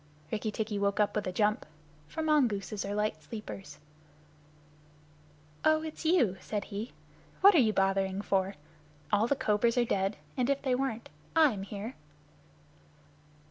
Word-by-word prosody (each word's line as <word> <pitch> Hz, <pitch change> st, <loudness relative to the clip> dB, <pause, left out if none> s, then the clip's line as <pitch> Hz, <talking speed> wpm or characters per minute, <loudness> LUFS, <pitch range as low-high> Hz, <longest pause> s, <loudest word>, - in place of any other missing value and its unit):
Rikki 220 Hz, 0 st, -1 dB
tikki 210 Hz, -1 st, -2 dB
woke 200 Hz, 0 st, 0 dB
up 210 Hz, -, +2 dB
with 210 Hz, -2 st, -1 dB
a -, -, -1 dB
jump, 210 Hz, +3 st, +1 dB, 0.4 s
for 320 Hz, -, -4 dB
the -, -, -2 dB
mongooses 220 Hz, -10 st, +1 dB
are 200 Hz, +1 st, -3 dB
light 210 Hz, -7 st, -1 dB
sleepers. 195 Hz, -3 st, -8 dB, 1.9 s
"Oh, 310 Hz, 0 st, +4 dB
it's 315 Hz, +1 st, -7 dB
you," 255 Hz, -, +3 dB
said 205 Hz, -2 st, -3 dB
he. 210 Hz, +4 st, -6 dB, 0.5 s
"What 400 Hz, +1 st, +9 dB
are 335 Hz, -, +6 dB
you 225 Hz, -4 st, +4 dB
bothering 195 Hz, 0 st, +1 dB
for? 195 Hz, 0 st, 0 dB, 0.6 s
All 210 Hz, +2 st, +3 dB
the 280 Hz, -, +2 dB
cobras 230 Hz, +1 st, +1 dB
are 240 Hz, -, +4 dB
dead. 195 Hz, -2 st, 0 dB, 0.2 s
And 250 Hz, 0 st, 0 dB
if 280 Hz, 0 st, 0 dB
they 260 Hz, -2 st, +1 dB
weren't, 250 Hz, -3 st, -2 dB, 0.3 s
I'm 295 Hz, -11 st, +4 dB
here." 205 Hz, +4 st, -6 dB
215 Hz, 150 wpm, -30 LUFS, 200-255 Hz, 1.9 s, What